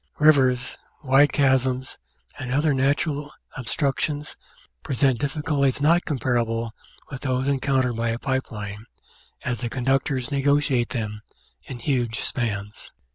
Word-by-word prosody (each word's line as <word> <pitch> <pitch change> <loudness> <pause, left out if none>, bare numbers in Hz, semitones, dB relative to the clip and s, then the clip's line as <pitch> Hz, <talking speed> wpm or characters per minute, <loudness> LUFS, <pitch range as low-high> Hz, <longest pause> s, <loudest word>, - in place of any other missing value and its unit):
Rivers, 135 -5 +3 0.2
wide 135 +2 +5
chasms, 130 -2 +1 0.4
and 125 -1 -4
other 145 +3 +2
natural 145 +2 0 0.2
obstructions 145 +3 -1 0.5
present 130 -2 +1
difficulties 145 -1 0
not 165 +4 +3
comparable 120 -5 0 0.4
with 135 - -6
those 130 -1 0
encountered 135 -3 +1
by 115 0 0
a 115 - -1
pipe 130 +1 -2
line, 105 0 -6 0.6
as 125 0 -2
the 120 - -2
con 125 0 -4
ductors 135 0 +1
negotiate 140 -3 +2
them 105 -3 -4 0.4
in 130 - -7
huge 120 -3 -1
spans. 105 -4 -4
130 Hz, 125 wpm, -24 LUFS, 120-140 Hz, 0.6 s, wide